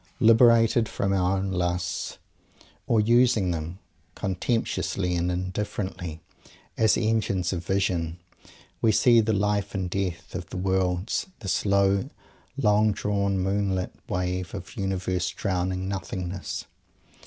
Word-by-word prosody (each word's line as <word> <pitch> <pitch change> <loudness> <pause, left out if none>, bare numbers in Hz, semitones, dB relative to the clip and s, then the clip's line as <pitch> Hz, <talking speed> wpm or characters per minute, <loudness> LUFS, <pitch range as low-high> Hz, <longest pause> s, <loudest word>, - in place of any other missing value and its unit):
Liberated 115 0 +5
from 100 0 -1
our 95 0 +2
own 95 0 -2
lusts, 90 -1 -2 0.7
or 115 - +3
using 115 -4 +4
them, 85 +2 -4 0.4
contemptuously 95 -2 -1
and 85 +1 0
indifferently, 90 -2 -4 0.6
as 110 -1 +3
engines 105 -5 0
of 85 -2 -3
vision, 90 -3 0 0.6
we 115 - +4
see 115 +2 +5
the 110 0 0
life 105 0 0
and 90 -2 -2
death 95 -3 -3
of - - -6
worlds, 95 - 0
the 100 - -6
slow, 100 +4 +2 0.5
long 105 -4 +3
drawn, 100 -1 0
moon 95 +1 0
lit 90 0 -3 0.2
wave 90 0 -2
of 95 +5 -8
Universe 95 -3 -1
drowning 95 -1 -2
Nothingness. 95 -1 -4
95 Hz, 120 wpm, -26 LUFS, 90-105 Hz, 0.7 s, Liberated